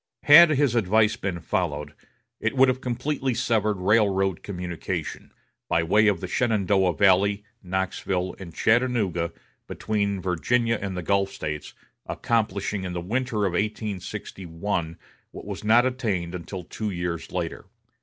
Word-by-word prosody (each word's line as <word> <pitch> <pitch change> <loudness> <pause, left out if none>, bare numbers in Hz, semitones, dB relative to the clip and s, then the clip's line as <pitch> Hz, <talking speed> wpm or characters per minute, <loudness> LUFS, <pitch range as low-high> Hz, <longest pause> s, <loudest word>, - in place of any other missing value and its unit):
Had 160 +3 +9
his 145 -4 +2
advice 110 -1 +3
been 95 -4 -4
followed, 75 -3 -2 0.5
it - - -1
would 130 0 +6
have 130 0 -1
completely 130 +1 -2
severed 110 -3 +1
railroad 95 -2 +2
communication, 90 -4 -5 0.4
by 85 - +2
way 105 +6 +4
of 100 -5 +1
the 95 - -4
Shenandoah 100 -5 +1
valley, 100 +1 +3 0.2
Knoxville, 95 -1 -2
and 90 -3 -8
Chattanooga, 110 -5 +1 0.4
between 100 -2 -1
Virginia 115 +6 0
and 95 -2 -4
the 90 - -3
Gulf 100 +2 +1
States, 75 -6 -6 0.3
accomplishing 105 -3 -1
in 90 -1 -4
the 90 - -3
winter 110 +3 -1
of 95 - -1
1861 95 -4 -3 0.3
what - - -10
was - - -6
not 115 +3 +5
attained 105 -10 -2
until 90 +1 -6
two 110 +5 -4
years 85 -4 -4
later. - - -4
100 Hz, 135 wpm, -25 LUFS, 90-110 Hz, 0.5 s, Had